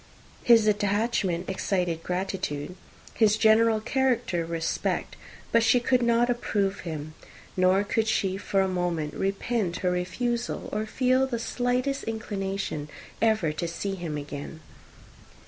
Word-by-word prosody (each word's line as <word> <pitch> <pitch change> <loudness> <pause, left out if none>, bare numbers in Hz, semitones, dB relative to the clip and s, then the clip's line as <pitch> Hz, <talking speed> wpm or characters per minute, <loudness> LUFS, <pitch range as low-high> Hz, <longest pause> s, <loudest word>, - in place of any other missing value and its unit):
His 230 -2 +6
attachment 205 -3 +1
excited 180 -3 -1
gratitude, 180 -4 -3 0.4
his 215 -1 +3
general 220 0 +4
character 240 -7 0
respect: 165 -1 -2 0.4
but 230 - +5
she 225 +2 +4
could 250 +1 +2
not 235 0 +3
approve 205 -5 0
him; 155 -3 -6 0.4
nor 185 +2 +4
could 220 +2 0
she 195 -3 +1
for 195 0 0
a 190 - +2
moment 175 -4 -1
repent 195 -1 -1
her 180 - +3
refusal, 235 +7 -2
or 215 +1 -1
feel 255 +3 +2
the 245 -3 -2
slightest 250 +4 -1
inclination 195 -8 -3 0.3
ever 215 -8 +2
to 155 +3 -3
see 195 +4 -3
him 170 -5 -4
again. 145 +2 -7
200 Hz, 130 wpm, -27 LUFS, 180-230 Hz, 0.4 s, His